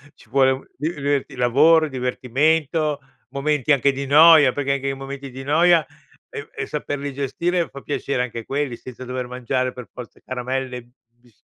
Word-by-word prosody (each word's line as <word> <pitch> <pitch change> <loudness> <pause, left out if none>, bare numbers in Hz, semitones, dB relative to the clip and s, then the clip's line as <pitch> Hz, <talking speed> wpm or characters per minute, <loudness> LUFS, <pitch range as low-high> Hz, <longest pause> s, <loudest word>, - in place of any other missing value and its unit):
Ci 115 - -21
vuole 135 +1 +4
u 130 0 -4
il 155 +4 -2
diverti 140 -1 -1
il 125 - -10
lavoro, 150 +7 +5
il 150 - -7
divertimento, 145 +4 0 0.3
momenti 150 0 0
anche 140 0 +3
di 140 +1 -4
noia, 150 -1 +7
perché 140 -1 -1
anche 135 0 -3
i - - -1
momenti 135 0 -7
di 130 +2 -8
noia, 165 +3 +4 0.4
e - - -8
e - - -3
saperli 145 -1 -4
gestire, 170 +6 -1
fa 140 - -10
piacere 140 -3 -2
anche 115 -1 -6
quelli 140 -3 -2
senza 130 +1 -10
dover 125 0 -4
mangiare 125 +1 -2
per 125 -2 -9
forza 125 -2 -10
caramelle, 125 -1 -4 0.2
bis 120 -1 -28
135 Hz, 180 wpm, -22 LUFS, 125-145 Hz, 0.4 s, noia